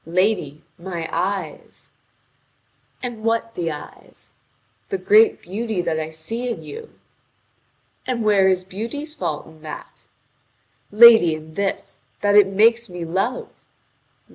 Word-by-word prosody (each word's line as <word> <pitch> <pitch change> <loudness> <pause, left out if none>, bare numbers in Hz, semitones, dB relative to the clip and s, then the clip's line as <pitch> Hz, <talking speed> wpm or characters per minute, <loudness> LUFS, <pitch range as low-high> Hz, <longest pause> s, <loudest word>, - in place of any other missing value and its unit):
"Lady, 170 -4 0 0.2
my 170 -2 -5
eyes." 190 -5 -4 1.1
"And 235 -3 -6
what 230 0 -1
the 170 -2 -3
eyes?" 150 -1 -11 0.6
"The 195 - -1
great 210 +4 +4
beauty 215 +2 -4
that 160 -2 -1
I 155 0 -4
see 225 +11 -5
in 235 - -5
you." 455 +1 -10 1.1
"And 245 -3 -1
where 200 -3 +4
is 185 -1 +1
beauty's 235 +11 -6
fault 165 - -4
in 160 -1 -17
that?" 155 -1 -10 0.8
"Lady, 225 -6 +7
in 155 0 -11
this: 200 +3 -3 0.2
that 205 0 +2
it 205 -2 +7
makes 225 +3 +3
me 175 -1 -6
love." 195 +9 -2
195 Hz, 125 wpm, -21 LUFS, 165-225 Hz, 1.1 s, Lady